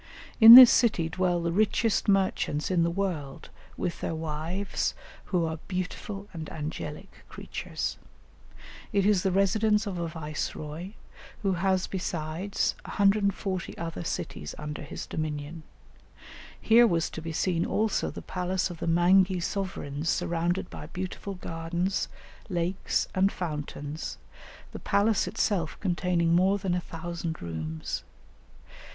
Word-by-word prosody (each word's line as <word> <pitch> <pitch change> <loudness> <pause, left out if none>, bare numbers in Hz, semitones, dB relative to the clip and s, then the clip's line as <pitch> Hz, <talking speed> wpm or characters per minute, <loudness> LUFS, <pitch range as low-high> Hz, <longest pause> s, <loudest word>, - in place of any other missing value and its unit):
In 225 0 +13
this 255 -1 +12
city 210 -9 +3
dwell 175 0 0
the 170 - 0
richest 215 +3 +1
merchants 190 -6 +1
in 180 -2 +3
the 170 - +2
world 170 -7 -4 0.3
with 175 - -3
their 165 - -2
wives, 160 +5 -2 0.3
who 175 -3 0
are 160 0 -4
"beautiful 195 +2 -4
and 160 -2 -6
angelic 155 +3 -7
creatures." - - -5 0.9
It 200 -1 +2
is 205 -3 +4
the 190 - +1
residence 210 +3 +2
of 190 -4 -4
a 170 - -2
viceroy, 155 +2 -5 0.5
who 195 -2 +2
has 185 +1 +1
besides, 180 +1 -2
140 200 -2 0
other 165 - -5
cities 75 - -4
under 150 0 -6
his 150 - -7
dominion. 155 0 -4 1.0
Here 235 +2 +6
was 170 -5 +1
to 160 - -6
be 165 0 -5
seen 170 +1 0
also 220 0 0
the - - -8
palace 180 0 -2
of 170 - -9
the - - -3
Mangi 180 +2 +4
sovereigns 170 -5 -3
surrounded 175 +2 0
by - - -8
beautiful 185 +2 -5
gardens, 170 +2 -2 0.4
lakes, 180 +1 -1
and 190 +1 +3
fountains, 150 -2 -5 0.5
the - - -7
palace 205 +1 +2
itself 175 -7 -1
containing 175 -3 +1
more 190 +3 +4
than 190 -3 -2
a 180 - 0
thousand 170 0 -5
rooms. 80 -1 -4
175 Hz, 130 wpm, -28 LUFS, 160-195 Hz, 1.0 s, In